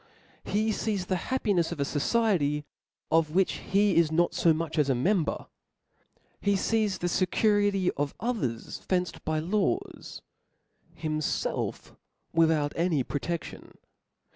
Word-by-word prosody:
He 215 +1 0
lees 205 -3 -2
the 185 - 0
happinefs 205 -10 +1
of 170 - -5
a - - +2
fociety, 150 -2 +1 0.5
of 160 -1 +2
which 190 0 +2
he 200 -1 +3
is 165 -2 +4
not 170 +2 +2
fo 170 - +3
much 160 0 -1
as 145 -2 +2
a 135 - +3
member; 175 - 0 0.9
he 200 0 +1
fees 210 -1 +1
the 175 - -2
fecurity 195 +1 +2
of 145 0 -2
others 165 - -3
fenced 180 -1 -2
bylaws, 190 - -2 0.7
himfelf 155 -1 -2 0.4
without 160 -3 +3
any 165 -5 +1
protedion. 165 +6 -5
175 Hz, 120 wpm, -28 LUFS, 155-205 Hz, 0.9 s, is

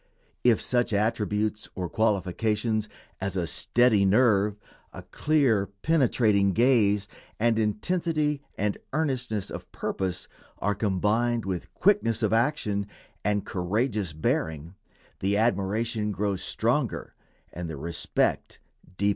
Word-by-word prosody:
If 120 -3 +5
such 120 -2 0
attributes 105 0 0
or 90 -2 -3
qualifications 110 +2 0 0.3
as 95 +1 -3
a 90 - 0
steady 115 +3 +3
nerve, 105 -1 +3 0.3
a - - -9
clear, 135 -10 +1 0.2
penetrating 115 -10 +3
gaze, 105 -4 +3 0.3
and 115 0 +2
intensity 150 - 0 0.2
and 105 0 -1
earnestness 125 -9 -1
of - - -8
purpose, 95 -2 -3 0.3
are 105 - 0
combined 110 +4 0
with 90 -3 -4
quickness 195 - +2
of - - +2
action 110 -5 +1 0.4
and 105 0 0
courageous 100 +1 -1
bearing, 80 +1 -2 0.5
the 100 +1 +1
admiration 110 0 0
grows 100 -1 -1
stronger - - -1 0.4
and 85 0 -5
the 80 - -5
respect 85 +4 -1 0.4
deeper. 100 +1 +2
105 Hz, 115 wpm, -27 LUFS, 100-120 Hz, 0.5 s, If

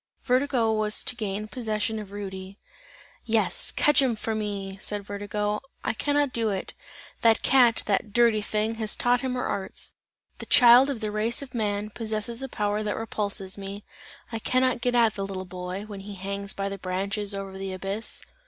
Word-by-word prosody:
Vertigo 250 -3 +2
was 215 0 +2
to - - +1
gain 210 -2 -3
possession 220 -2 -2
of 210 -2 -8
Rudy. 195 -1 -7 0.7
"Yes, 225 - +1
just - - -1
catch 295 -1 +5
him 255 -4 +2
for 220 +1 -2
me" 200 -3 -3
said 205 -1 -3
Vertigo. 205 +1 -2 0.2
"I - - 0
cannot 290 +3 +1
do 225 -2 +1
it! 195 -2 -3 0.5
The 225 -1 +6
cat, 245 -2 +4
the 200 - +3
dirty 225 0 +3
thing, 215 +1 0
has 215 -1 +1
taught 245 0 +2
him 255 -1 -2
her 250 - -1
arts! 190 - -3 0.5
The - - -7
child 245 +2 +8
of 255 -5 -3
the 215 -1 -2
race 225 +5 0
of 265 -2 -11
man, 210 -2 -1
possesses 220 +2 -3
a 270 - -4
power, 210 -2 -1
that 210 -1 -2
repulses 200 -3 -1
me; 200 +1 -6 0.5
I 225 - -3
cannot 255 +1 +2
get 245 0 +1
at 230 -2 +5
the 200 - -4
little 190 -1 -4
boy, 180 +2 -5
when 205 -2 -8
he 200 +1 -8
hangs 200 +1 -3
by 195 0 -2
the 200 0 -5
branches 195 +2 -2
over 195 -1 -5
the 195 0 -4
abyss. 195 +4 -3
210 Hz, 190 wpm, -26 LUFS, 200-235 Hz, 0.7 s, child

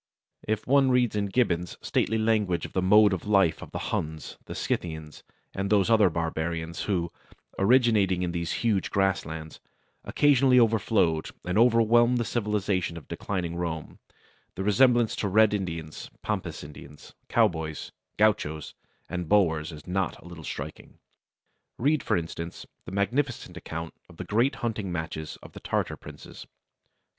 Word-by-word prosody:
If 110 0 -1
one 135 0 +4
reads 125 -4 +2
in 100 -1 0
Gibbon's 90 -6 0
stately 110 - 0
language 105 -7 +1
of - - -10
the 95 - +1
mode 105 +2 +6
of 95 +1 -4
life 95 -6 +3
of - - -9
the - - -5
Huns, 80 0 -4
the - - -7
Scythians, 80 -3 -4 0.3
and 100 0 -2
those 105 +1 +3
other 110 -4 +5
barbarians 80 0 -3
who, 85 -5 -1 0.5
originating 100 -4 +3
in 85 - -1
these 85 -1 -3
huge 105 -5 +1
grasslands, 80 -5 -1 0.4
occasionally 135 -3 +4
overflowed 105 -8 +2 0.2
and 90 0 -2
overwhelmed 120 +1 +4
the 120 - 0
civilization 105 -6 -1
of 75 - -11
declining 90 -4 -3
Rome, 85 -3 -4 0.6
the 95 - -3
resemblance 120 +3 +4
to 105 - -1
Red 110 +2 +4
Indians, 85 -6 -4
Pampas - - -3
Indians, 75 0 -12 0.2
cowboys, 80 -9 0 0.3
gauchos, 80 -8 +1 0.3
and 90 -1 -4
Boers 80 -6 +2
is 75 -1 -11
not 95 0 -1
a - - -18
little 85 -2 -10
striking. - - -7 0.8
Read, 145 +3 +2
for - - +1
instance, 85 0 -6 0.2
the - - -8
magnificent 110 0 -1
account 85 -2 -6 0.2
of - - -16
the - - -6
great 120 +6 +2
hunting 105 -5 -2
matches 80 -2 -5
of - - -11
the - - -10
Tartar - - -2
princes. - - -12
95 Hz, 150 wpm, -27 LUFS, 85-110 Hz, 0.8 s, mode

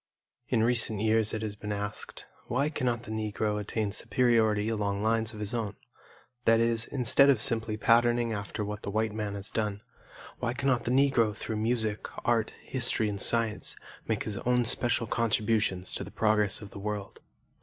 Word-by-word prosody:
In 115 -3 +2
recent 115 -3 +3
years 110 0 +2
it 110 0 -3
has 105 -1 -4
been 105 0 -6
asked, 105 +1 -5 0.2
"Why 140 +5 0
cannot 120 -6 -1
the 110 - -8
Negro 105 -1 -2
attain 105 0 -2
superiority 110 -2 +2
along 105 -2 -1
lines 110 0 +1
of 110 - -10
his 105 +1 -3
own," 110 -4 -2 0.7
that 115 0 +5
is, 115 0 +1
instead 140 +1 +4
of 135 -5 +4
simply 110 -1 +1
patterning 120 +1 +3
after 105 0 -4
what 105 0 -5
the - - -5
white 110 +1 -1
man 105 -2 -3
has 100 0 -6
done, 105 -2 -2 0.6
why 120 0 -2
cannot 130 -2 0
the - - -1
Negro 125 -5 +3
through 110 - -4
music, 110 -1 -1 0.2
art, 115 -2 +2
history, 120 -4 0
and 100 -1 -4
science, 115 -2 +2 0.3
make - - -1
his 105 -2 -3
own 125 0 +1
special 115 +1 +2
contributions 110 -4 0
to - - -3
the - - -9
progress 105 -2 +1
of 100 - -11
the - - -9
world? 105 0 -5
110 Hz, 175 wpm, -29 LUFS, 105-115 Hz, 0.7 s, that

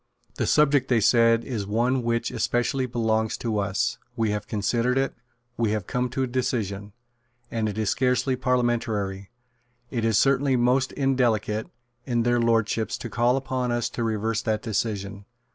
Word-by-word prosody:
The - - 0
subject, 145 -3 +3
they 120 -3 +3
said, 115 +1 +4
is 110 -7 -4
one 120 +5 +1
which 115 0 -1
especially 125 +2 0
belongs 110 -2 0
to 110 -3 -2
us; 100 -1 -1 0.2
we 110 -2 0
have 105 -1 -3
considered 115 +4 0
it; 135 0 0 0.4
we 115 -2 +1
have 105 -4 -2
come 125 +3 -1
to 135 +1 -2
a - - +2
decision; 105 -5 -2 0.6
and 110 -2 -1
it 105 - -6
is 110 -3 0
scarcely 130 +1 +1
parliamentary, 115 -6 -1 0.6
it 115 -3 -2
is 110 -2 +2
certainly 135 0 +3
most 125 +2 +2
indelicate, 115 -6 0 0.4
in 120 -2 0
their 120 0 +2
Lordships, 115 -1 +1
to - - -7
call 120 +2 +2
upon 130 -2 -2
us 120 0 0
to - - -4
reverse 110 0 -1
that 110 -3 -1
decision. 100 -2 -3
115 Hz, 160 wpm, -25 LUFS, 110-125 Hz, 0.6 s, said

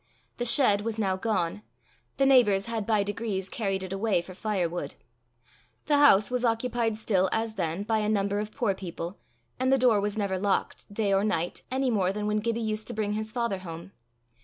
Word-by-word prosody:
The 240 - -2
shed 230 -4 +4
was 225 0 -3
now 195 -4 +1
gone; 190 -2 -1 0.6
the 275 - +3
neighbours 230 -8 +5
had 225 -3 -3
by 215 -3 +3
degrees 200 -2 -3
carried 195 -4 -2
it 190 0 -5
away 200 -1 +1
for 185 - -10
firewood. 180 -7 -2 0.9
The 295 -2 +3
house 215 -7 +6
was 250 -1 -1
occupied 230 -1 0
still 190 -4 +1
as 225 0 -1
then 170 -1 -2
by 220 +1 +1
a 210 0 0
number 200 -1 +1
of 210 0 -4
poor 230 -7 0
people, 180 -1 -7 0.4
and 260 +1 +2
the 270 - +5
door 240 -5 +4
was 205 +1 -2
never 195 -3 -1
locked, 200 +1 -1
day 205 -1 0
or 195 +1 +3
night, 175 -5 -1
any 260 0 0
more 190 -4 +1
than 210 +1 -4
when 210 0 +1
Gibbie 230 +1 -1
used 215 -1 -3
to - - -5
bring 210 -1 -1
his 215 +1 -3
father 235 -5 -1
home. 170 0 -8
210 Hz, 200 wpm, -27 LUFS, 195-230 Hz, 0.9 s, house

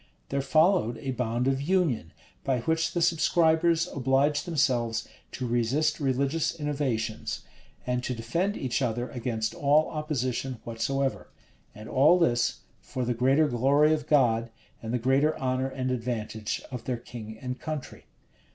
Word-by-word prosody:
There 140 0 0
followed 155 - +3
a 135 - -4
bond 120 0 -1
of 135 0 +1
union, 150 - +1 0.3
by 130 -3 0
which 160 +5 0
the 175 - +1
subscribers 165 0 +3
obliged 140 +2 +2
themselves 130 -8 +1 0.3
to 130 - -4
resist 125 +6 +1
religious 140 +4 0
innovations, 135 -7 -2 0.4
and 125 0 -1
to 125 - -2
defend 170 - -1
each 130 0 -1
other 120 0 -1
against 115 -3 -2
all 145 +2 +3
opposition 130 -5 -2
whatsoever: 130 +4 -2 0.5
and 105 +1 -10
all 150 +7 +5
this, 120 -9 +1 0.2
for 130 -1 -4
the 125 - 0
greater 135 +6 +3
glory 140 +5 +3
of 150 -2 -2
God, 120 -5 +3 0.3
and 110 - -5
the 125 - +1
greater 135 +5 +2
honor 130 0 0
and 130 -1 -2
advantage 115 -3 -3
of 125 -3 -6
their 125 -2 -1
king 110 -2 -9
and 125 +1 -5
country. 155 -4 -6
130 Hz, 145 wpm, -27 LUFS, 120-150 Hz, 0.5 s, all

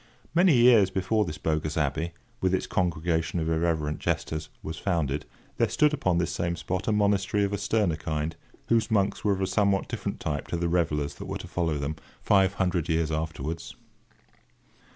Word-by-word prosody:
Many 175 -2 +5
years 120 -5 +6
before 95 +3 +1
this 80 -4 -5
bogus 75 0 -1
abbey, 80 +3 -1 0.3
with 95 0 +2
its - - -2
congregation 85 -1 0
of 80 - -1
irreverent 80 -2 0
jesters, 80 -1 -2
was 80 0 -5
founded, 75 -6 -1 0.3
there - - +2
stood 150 0 +3
upon 95 -11 +1
this 85 -1 0
same 85 0 -1
spot 90 +3 -3
a - - +3
monastery 100 -1 +2
of 100 0 -1
a - - 0
sterner 100 -5 +1
kind, 80 0 -3 0.3
whose 115 -1 +2
monks 100 -3 +1
were 105 - +3
of 95 - -3
a - - +2
somewhat 100 0 +1
different - - -4
type 75 -3 -3
to 85 - -2
the 85 0 0
revellers 75 -4 0
that - - -7
were - - -3
to - - -9
follow 80 -4 -1
them, 70 +2 -3 0.2
five 95 -1 +3
hundred 90 -3 0
years 80 -1 +1
afterwards. 80 0 -4
85 Hz, 185 wpm, -27 LUFS, 80-100 Hz, 0.3 s, years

